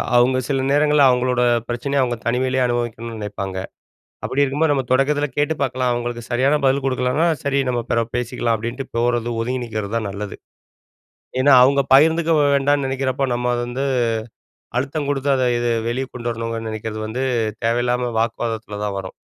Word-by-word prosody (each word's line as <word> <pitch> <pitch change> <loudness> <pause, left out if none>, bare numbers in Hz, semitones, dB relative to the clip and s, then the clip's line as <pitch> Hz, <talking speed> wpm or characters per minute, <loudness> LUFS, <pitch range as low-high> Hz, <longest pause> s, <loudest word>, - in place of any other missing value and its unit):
அவங்க 125 +2 +4
சில 135 -2 0
நேரங்கள்ல 150 0 +4
அவங்களோட 125 0 +1 0.3
பிரச்சனைய 135 +4 0
அவங்க 120 -1 -2
தனிமையிலேயே 130 +2 +1
அனுபவிக்கணும்னு 115 -1 -3
நினைப்பாங்க. 100 -2 -5 0.7
அப்படி 140 - +1
இருக்கும்போது 145 +3 +1
நம்ம 135 -2 0
தொடக்கத்தில 145 +3 +2
கேட்டு 145 +2 +1
பார்க்கலாம். 130 -1 0
அவங்களுக்கு 120 0 -3
சரியான 135 +5 +2
பதில் 135 0 +2
கொடுக்கலனா 130 +4 +1 0.2
"சரி, 140 0 +1
நம்ம 120 -1 0
பிறகு 115 0 0
பேசிக்கலாம்." 120 -1 -1
அப்படின்ட்டு 120 +5 -5
போறது 120 0 +1
ஒதுங்கி 125 +2 -2
நிக்கிறது 110 -2 -4
தான் 110 -3 -2
நல்லது. 100 +1 -6 1.0
ஏன்னா 140 +2 +5
அவங்க 140 +2 +3
பகிர்ந்துக்க 160 +3 +4 0.2
வேண்டாம்னு 140 0 +2
நெனைக்கிறப்ப, 135 0 -1
நம்ம 125 0 0
வந்து 125 +3 -3 0.9
அழுத்தம் 140 +2 -2
குடுத்து 140 0 0
அத 130 - 0 0.2
இது 120 0 0 0.2
வெளியே 130 +3 -2
கொண்டு 120 -1 -3
வரணுங்கன்னு 115 0 -4
நெனைக்கிறது 110 0 -5
வந்து 125 +4 -2 0.4
தேவையில்லாம 120 +1 0
வாக்குவாதத்தில 110 -2 -3
தான் 100 -1 -3
வரும். 95 -1 -8
125 Hz, 155 wpm, -20 LUFS, 115-135 Hz, 1.0 s, ஏன்னா